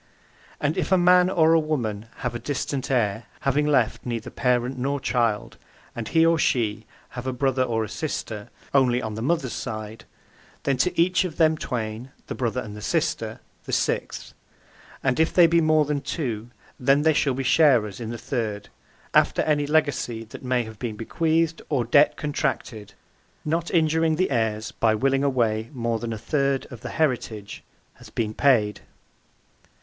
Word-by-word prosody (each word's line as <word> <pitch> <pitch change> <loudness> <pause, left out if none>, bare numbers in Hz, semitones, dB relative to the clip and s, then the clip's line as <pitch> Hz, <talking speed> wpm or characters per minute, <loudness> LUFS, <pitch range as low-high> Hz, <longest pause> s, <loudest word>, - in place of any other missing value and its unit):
And 145 +2 0
if - - -2
a 190 - +6
man 180 0 +5
or 165 -3 +4
a 165 - +5
woman 115 -9 -2 0.2
have 125 - -1
a 120 - -4
distant 140 -1 -3
heir 110 -4 0 0.2
(having 145 +2 +1
left 130 -7 +2
neither 120 -2 -4
parent 125 +1 0
nor 140 +3 -1
child), 115 -3 -1 0.4
and 115 -2 -4
he 165 0 +4
(or 165 0 +3
she) 110 -6 0 0.2
have 125 +1 -7
a - - 0
brother 130 0 0
or 115 -3 0
a - - -4
sister 110 -5 -5 0.2
(only 125 -3 +4
on 110 -4 -4
the 110 - -5
mother's 135 -1 0
side) 110 0 -6 0.6
then 140 - +1
to 175 +8 0
each 180 +2 +3
of 180 -4 -5
them 160 -1 +4
twain 115 -3 -4 0.2
(the - - -5
brother 125 0 -2
and 105 -3 -8
the 105 - -9
sister) - - -1 0.2
the - - -6
sixth, - - -2 0.7
and 135 0 +1
if 160 - +3
they 175 - +6
be 170 0 +4
more 155 -1 +3
than 145 -1 -1
two, 120 -6 -4 0.3
then 135 +3 +3
they 160 0 +4
shall 140 -3 +1
be 135 - -2
sharers 125 -8 +3
in 115 -2 -5
the 120 - -4
third, 110 -5 -3 0.4
after - - +3
any 145 -2 +1
legacy 145 -7 0
that 110 - -11
may 125 -1 0
have 110 -1 -11
been 115 -4 -4
bequeathed 160 +8 0
or 130 -6 +1
debt 145 +6 +4
(contracted) 120 -7 -3 0.5
not 165 +2 -1
injuring 160 -1 +2
(the 185 -1 0
heirs 110 -2 -1
by 110 -1 +2
willing 135 +4 +1
away 115 -5 +1
more 115 -3 -1
than 115 0 -4
a 110 - -3
third 140 +3 0
of 120 -3 -9
the - - -6
heritage) 120 -9 -2 0.3
hath - - -15
been 110 -2 -1
paid. 110 -6 +2
130 Hz, 175 wpm, -24 LUFS, 115-150 Hz, 0.7 s, a